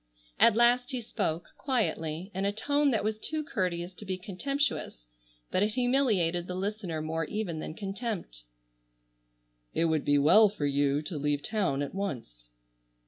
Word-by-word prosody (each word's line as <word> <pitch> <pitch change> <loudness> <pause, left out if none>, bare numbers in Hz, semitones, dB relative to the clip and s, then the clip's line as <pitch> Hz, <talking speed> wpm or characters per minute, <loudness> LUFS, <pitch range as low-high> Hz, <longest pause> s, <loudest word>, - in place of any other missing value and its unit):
At 230 - +6
last 245 +2 +4
he 255 -3 -2
spoke, 175 -7 -2
quietly, 190 - -1
in 190 +1 -2
a 200 - +2
tone 285 +7 +1
that 225 -6 +1
was 215 0 -1
too 310 +6 -2
courteous 180 -8 -2
to 195 - -10
be 190 -2 -3
contemptuous, 200 - -2 0.5
but - - +2
it 210 +1 +1
humiliated 220 -10 +2
the 180 - -4
listener 190 -5 -3
more 160 +1 -2
even 180 -4 -3
than 155 - -6
contempt: 195 - -5 1.3
"It 165 - +2
would 160 -2 +1
be 145 - +3
well 205 +10 +7
for 195 -8 -3
you 140 +1 +1
to 155 -1 -4
leave 145 0 0
town 185 -11 0
at 140 - -5
once." 115 - -5
190 Hz, 160 wpm, -29 LUFS, 155-220 Hz, 1.3 s, well